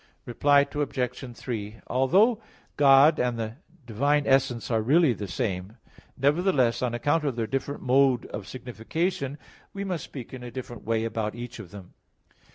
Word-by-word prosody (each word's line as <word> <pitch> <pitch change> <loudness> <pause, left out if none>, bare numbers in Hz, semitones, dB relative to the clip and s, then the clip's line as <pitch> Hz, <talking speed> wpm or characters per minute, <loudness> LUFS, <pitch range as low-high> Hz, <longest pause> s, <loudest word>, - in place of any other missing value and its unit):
Reply 140 +4 +4
Obj. 130 -4 -3
3: 110 -3 -5
Although 195 - +3 0.3
God 140 +2 +6
and 125 -1 0
the 115 +1 -4 0.3
divine 140 +6 +1
essence 125 -4 +1
are 110 -1 +2
really 145 +4 +4
the 105 -2 -6
same, 95 0 -3 0.4
nevertheless, 140 -3 +2
on 125 -2 -1
account 145 +7 +1
of 140 -5 -1
their 115 -2 -1
different 135 +4 -4
mode 130 -1 +3
of 100 -2 -7
signification, 135 +4 -3 0.4
we 200 - -4
must 180 -6 -3
speak 130 -4 -9
in 130 - -7
a 125 - -7
different 120 0 -8
way 115 0 0
about 110 -1 -3
each 120 0 -8
of 100 -6 -9
them. 95 -1 -12
125 Hz, 160 wpm, -26 LUFS, 115-145 Hz, 0.4 s, God